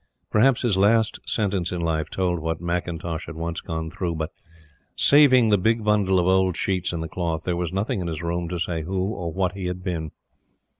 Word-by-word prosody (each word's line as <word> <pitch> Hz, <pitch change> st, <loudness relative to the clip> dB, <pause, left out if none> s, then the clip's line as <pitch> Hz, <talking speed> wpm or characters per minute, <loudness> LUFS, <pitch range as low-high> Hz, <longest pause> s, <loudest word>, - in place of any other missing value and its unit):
Perhaps 125 Hz, +4 st, +4 dB
his 110 Hz, -6 st, +2 dB
last 110 Hz, +3 st, +3 dB
sentence 100 Hz, -5 st, 0 dB
in 90 Hz, -, -3 dB
life 80 Hz, -2 st, -1 dB
told 90 Hz, -2 st, -1 dB
what 80 Hz, +1 st, -2 dB
McIntosh 85 Hz, -1 st, -3 dB
had -, -, -7 dB
once 85 Hz, +1 st, -4 dB
gone 80 Hz, 0 st, -4 dB
through; 85 Hz, -3 st, -3 dB
but, 80 Hz, +1 st, -3 dB, 0.6 s
saving 130 Hz, -5 st, +6 dB
the 105 Hz, -2 st, +4 dB
big 110 Hz, +3 st, +1 dB
bundle 105 Hz, -3 st, +2 dB
of 90 Hz, -, +2 dB
old 95 Hz, -1 st, +2 dB
sheets 95 Hz, -2 st, -1 dB
in 85 Hz, -2 st, -3 dB
the 80 Hz, -, -3 dB
cloth, 80 Hz, -1 st, -3 dB
there 90 Hz, -, -1 dB
was 85 Hz, -1 st, -2 dB
nothing 100 Hz, +3 st, -1 dB
in 85 Hz, -, -3 dB
his 80 Hz, -1 st, -4 dB
room 85 Hz, 0 st, -2 dB
to 90 Hz, -, -3 dB
say 85 Hz, -1 st, -2 dB
who 95 Hz, +5 st, -2 dB
or 85 Hz, -6 st, -4 dB
what 95 Hz, +1 st, 0 dB
he 95 Hz, 0 st, -6 dB
had 90 Hz, 0 st, -4 dB
been. 80 Hz, -4 st, -3 dB
90 Hz, 210 wpm, -24 LUFS, 85-100 Hz, 0.6 s, saving